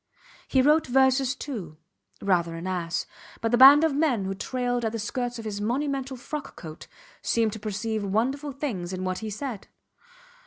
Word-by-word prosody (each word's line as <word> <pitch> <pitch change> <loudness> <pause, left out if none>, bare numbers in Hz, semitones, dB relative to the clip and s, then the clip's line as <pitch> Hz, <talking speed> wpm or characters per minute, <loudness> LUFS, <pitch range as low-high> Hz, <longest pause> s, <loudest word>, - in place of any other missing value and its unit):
He 260 -1 +3
wrote 300 +2 +4
verses 265 +1 +3
too. 205 - -6 0.5
Rather 170 -4 +1
an 165 +2 -6
ass. 175 -3 -2 0.3
But 225 - -1
the 240 - +4
band 280 +4 +10
of 320 -3 +2
men 275 -9 +1
who 195 - -2
trailed 245 +4 -2
at 220 0 -1
the - - -2
skirts 245 +3 -3
of 225 - -8
his 205 -1 -4
monumental 270 +3 -2
frock 290 +4 -6
coat 160 -1 -10 0.3
seemed 225 -2 +1
to 220 - -7
perceive 215 +1 -3
wonderful 260 +9 -1
things 215 - -4
in 185 0 -4
what 185 0 -2
he 220 - -5
said. 215 0 -5
230 Hz, 180 wpm, -26 LUFS, 195-270 Hz, 0.5 s, band